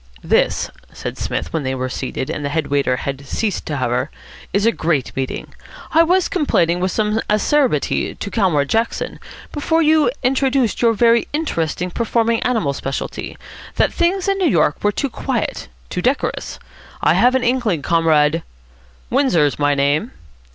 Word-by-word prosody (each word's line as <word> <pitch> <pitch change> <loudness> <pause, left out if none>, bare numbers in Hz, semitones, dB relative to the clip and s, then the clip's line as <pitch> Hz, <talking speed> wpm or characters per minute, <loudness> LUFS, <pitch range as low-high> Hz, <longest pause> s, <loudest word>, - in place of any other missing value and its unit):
"This," - - +1 0.2
said - - -6
Psmith, - - -3
when 160 - 0
they 130 -1 -2
were 130 0 -2
seated, 130 +1 -4
and 145 - -4
the 145 - -1
head 155 0 -2
waiter 140 -3 +2
had 140 +1 -5
ceased 210 +3 -2
to 150 - -2
hover, 125 +2 -1 0.4
"is 200 +2 +1
a 230 - +5
great 155 - -1
meeting. 135 -1 -4 0.4
I 325 - +5
was 360 +2 +3
complaining 180 - +1
with 185 +1 0
some 215 0 0
acerbity 265 +6 +1
to - - -6
Comrade 170 -10 +2
Jackson, 225 +6 -1 0.3
before 320 +2 +1
you 310 -3 +4
introduced 260 -2 +1
your 230 -1 +4
very 230 +1 +3
interesting 180 - -2
performing 230 +2 +1
animal 220 - 0
speciality, 135 0 -5 0.4
that - - +2
things 360 +2 +1
in 395 0 +1
New 360 -4 +3
York 150 - +1
were 205 - +3
too 280 - -1
quiet, - - -3 0.2
too 180 - -2
decorous. 255 +6 -1 0.5
I - - +5
have 250 +2 +4
an 260 - +1
inkling, 235 - +1
Comrade 165 -1 +3 0.4
" 60 0 -30
"Windsor's 180 - +2
my 145 0 +2
name." 140 - +1
200 Hz, 165 wpm, -19 LUFS, -, 0.5 s, a